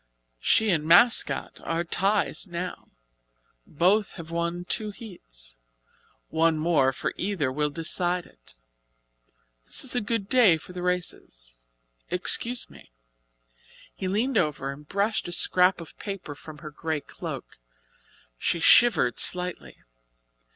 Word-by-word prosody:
"She 220 - +3
and 160 -4 +1
'Mascot' 175 +9 +3
are 165 +1 -2
ties 200 +4 0
now 180 +1 -6 0.8
both 190 +7 +2
have 165 -2 -10
won 170 +1 -2
two 215 +3 -2
heats. - - -11 0.7
One 160 0 +2
more 155 -4 +2
for 135 - -4
either 180 -9 -1
will 150 +2 0
decide 175 +3 0
it. - - -18 1.1
This - - +1
is 260 -1 +1
a 245 - +1
good 210 -1 -2
day 225 -9 +5
for 170 +3 -13
the 180 - -6
races. 170 - -4 0.6
Excuse 235 +6 +1
me." - - -17 1.0
He 190 - -5
leaned 225 +8 +1
over 145 -3 -1
and 145 +2 -12
brushed 200 +3 -1
a - - -6
scrap 180 +1 +4
of 165 - -11
paper 195 -7 -6
from 150 +1 -12
her 155 - -7
grey 155 0 -3
cloak. - - -8 0.8
She 170 - 0
shivered 185 - +5
slightly. 180 - -1
175 Hz, 130 wpm, -26 LUFS, 155-200 Hz, 1.1 s, day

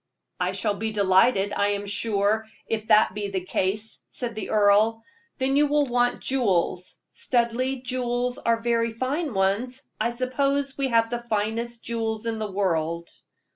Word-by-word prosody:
"I 180 +1 0
shall 195 +2 0
be 220 +2 -3
delighted, 200 +1 +3
I 200 - +1
am 205 0 -1
sure, 210 +1 0 0.2
if 220 -1 -3
that 215 -3 +5
be 205 0 -3
the 190 -2 -3
case," 205 +4 -2
said 240 -2 -4
the 220 -2 -5
earl. 215 +2 +3 0.3
"Then 265 +1 +1
you 295 +1 +4
will 295 0 +2
want 245 -1 +1
jewels. 190 -8 0
Studleigh 250 +2 -1
jewels 245 0 -1
are 230 0 +2
very 230 0 +1
fine 260 - -2
ones 210 +7 0
I - - +1
suppose 275 +3 -1
we 275 -1 0
have 230 -2 +2
the 240 0 -2
finest 230 +1 -2
jewels 225 -1 -2
in 225 -1 -2
the 215 -2 -3
world." 170 -3 -1
225 Hz, 160 wpm, -25 LUFS, 205-245 Hz, 0.3 s, that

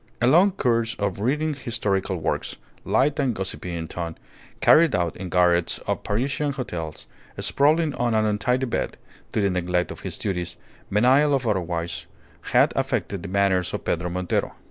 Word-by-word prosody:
A 120 - +2
long 170 +10 +6
course 120 -9 0
of 100 -2 -2
reading 150 +8 0
historical 105 -8 -1
works, 80 - -2 0.3
light 145 +3 +2
and 130 -5 +1
gossipy 95 -2 -3
in 80 -1 -4
tone, 85 0 -5 0.4
carried 160 -2 +5
out 85 -2 0
in 95 -1 -6
garrets 90 -1 +3
of - - -1
Parisian 135 +7 -1
hotels, 85 - -5 0.3
sprawling 155 +2 +2
on 120 -3 0
an 110 0 +3
untidy 125 +5 +1
bed, 120 - -2 0.3
to - - 0
the 100 -1 +2
neglect 90 0 0
of - - -7
his - - -5
duties, 90 -3 -3 0.3
menial 130 +8 +4
or 125 -4 -1
otherwise, 85 -3 -3 0.4
had - - +4
affected 100 -3 -1
the 100 - -7
manners 95 -2 +1
of - - -6
Pedro 90 +1 -1
Montero. 90 0 -1
105 Hz, 165 wpm, -24 LUFS, 90-130 Hz, 0.4 s, long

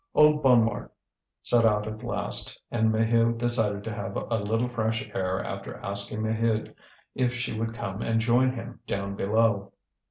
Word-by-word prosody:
Old 150 0 +5
Bonnemort 115 -5 +3 0.5
set 120 -1 +4
out 105 -1 +2
at 110 +1 -6
last, 120 - +2
and 110 -1 +2
Maheu 115 +1 +2
decided 110 -4 +2
to 110 - -5
have 100 -1 -5
a 115 -1 -2
little 115 +4 0
fresh 115 +1 -2
air 95 0 -1
after - - -6
asking 100 +2 -3
Maheude 110 0 -1 0.4
if 125 -1 0
she 125 0 -3
would 115 +1 -3
come 100 -3 -5
and 115 0 0
join 125 +3 +3
him 120 -1 -8
down 100 0 -3
below. 100 0 +1
115 Hz, 160 wpm, -26 LUFS, 105-120 Hz, 0.5 s, Old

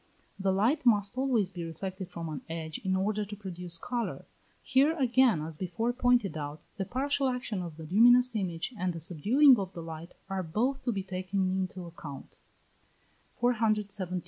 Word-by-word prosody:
The 195 0 +2
light 235 +11 +2
must 210 -2 +3
always 250 -8 +1
be 175 -2 -6
reflected 185 +3 -6
from 165 -1 -6
an 155 -2 -5
edge 160 -2 -4
in 190 0 0
order 210 +2 0
to 205 0 -7
produce 180 -4 -5
colour. 240 +6 -3 0.4
Here 285 +5 +3
again, 250 - +3
as 160 -1 -6
before 190 +7 -1
pointed 245 -6 +2
out, 150 0 -5 0.2
the 195 - -2
partial 275 +4 0
action 245 -6 -3
of 170 -3 -7
the 160 - -8
luminous 240 +8 +5
image 185 +2 -2
and 185 -3 -1
the 165 - -6
subduing 220 - +5
of 190 -1 -4
the 170 - -7
light 165 +1 -8
are 195 -1 -2
both 225 +11 -1
to 245 - +2
be 195 -3 -2
taken 185 0 -1
into 185 0 -2
the - - -7
account. 150 -5 -10
190 Hz, 170 wpm, -30 LUFS, 170-245 Hz, 0.4 s, luminous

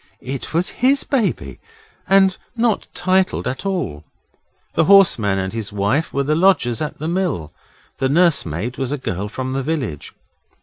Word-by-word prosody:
It 135 0 -5
was 170 +3 0
HIS 270 +2 +3
baby, 245 -8 -1 0.5
and 190 -1 +5 0.2
not 230 -2 0
titled 185 +1 +1
at 130 +9 -3
all. 125 - -3 0.7
The 165 - +2
horseman 160 - +5
and 95 +1 -3
his 110 -3 -4
wife 105 +10 0
were 140 - 0
the 150 +3 0
lodgers 155 -9 +2
at 150 - -4
the 155 - -4
mill. 170 - -2 0.5
The 130 - +1
nursemaid 130 - +1
was 130 -1 -2
a 145 - -1
girl 100 -5 -4
from 130 +4 -4
the 135 +1 -1
village. 130 - -3
145 Hz, 160 wpm, -20 LUFS, 115-185 Hz, 0.7 s, and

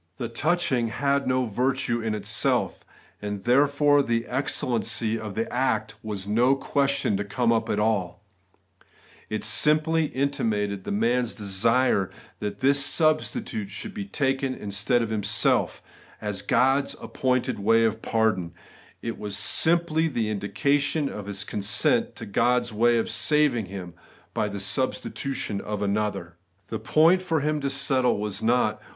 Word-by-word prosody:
The 120 - -4
touching 135 -2 0
had 140 +4 0
no 130 0 +1
virtue 120 +1 -1
in 110 -1 -2
itself, 105 - 0 0.4
and 105 -1 -5
therefore 145 +3 +4
the 115 -3 -1
excellency 115 -3 -1
of 105 -3 -7
the 115 - -1
act 110 -4 0
was 105 -3 -5
no 120 +6 +3
question 140 -4 0
to 100 - -2
come 110 +4 0
up 115 -1 0
at 105 - 0
all: 100 -4 -1 1.1
it 110 - -3
simply 155 +1 +3
intimated 110 -9 -2
the - - -4
man's 120 +3 0
desire 105 0 +1 0.3
that 105 -1 -5
this 140 +1 +4
sacrifice 195 - 0
should 210 - -7
be 205 -3 -5
taken 135 -7 -1
in 100 - -7
stead 105 +5 +1
of 110 - -4
himself, 105 -2 +1 0.4
as 105 -2 -4
God's 135 +2 +2
appointed 130 -4 -1
way 115 +3 +3
of 110 0 -1
pardon; 100 -7 0 0.5
it 115 - -4
was 100 -1 -4
simply 165 +7 +3
the 115 -7 -2
indication 140 +9 0
of 105 -1 -7
his 100 -2 -4
consent 100 +1 +1
to - - -8
God's 120 +3 +1
way 120 +2 +3
of 115 - 0
saving 145 -9 +2
him, 90 -2 -8 0.4
by 105 - 0
the 100 0 -5
substitution 130 0 -2
of 105 -1 -4
another. 100 -4 -2 0.3
The 110 - -4
point 160 - +4
for 165 -4 -1
him 150 0 -1
to 140 - -1
settle 135 -3 +1
was 105 -1 -3
not. 110 -2 +1
115 Hz, 145 wpm, -25 LUFS, 105-140 Hz, 1.1 s, therefore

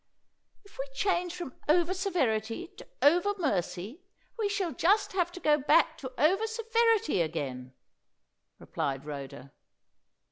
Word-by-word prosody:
"If 405 - -19
we 270 +1 -4
change 355 +1 0
from 345 -8 -6 0.2
over 345 +3 +4
severity 330 - -1
to - - -12 0.2
over 355 +7 +4
mercy, 200 - -2 0.3
we 435 -3 -1
shall 395 -4 -1
just 390 - +2
have 355 -2 0
to 360 - -8
go 300 -3 +3
back 305 +4 +3
to 260 -2 -6
over 385 +9 +3
severity 455 - +2
again," 130 -6 -4 0.8
replied 135 0 -4
Rhoda. 140 -2 -8
330 Hz, 130 wpm, -29 LUFS, -, 0.8 s, over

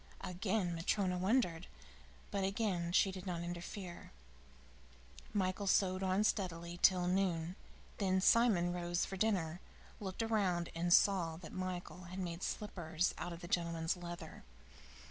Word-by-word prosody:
Again 185 0 -1
Matryona 180 +2 0
wondered, 185 -4 +1 0.6
but 200 -1 0
again 190 -4 0
she 190 +2 +4
did 185 0 -8
not 170 -2 -2
interfere. 175 +1 -6 1.2
Michael 195 0 0
sewed 185 -1 +3
on 190 +2 +2
steadily 175 -4 -1
till 180 -2 +5
noon. 180 -2 0 0.4
Then 190 -2 +2
Simon 190 -4 +4
rose 175 0 0
for 195 - -5
dinner, 185 -5 0 0.4
looked 195 +2 -3
around, 190 -6 +1
and 175 +1 -1
saw 175 -4 +4
that 165 -2 -10
Michael 185 -1 -4
had 180 +2 -8
made 175 -2 -4
slippers 175 -5 -1
out 175 - -4
of 170 0 -8
the 175 - -7
gentleman's 170 -1 0
leather. 175 -1 -8
180 Hz, 135 wpm, -36 LUFS, 175-195 Hz, 1.2 s, till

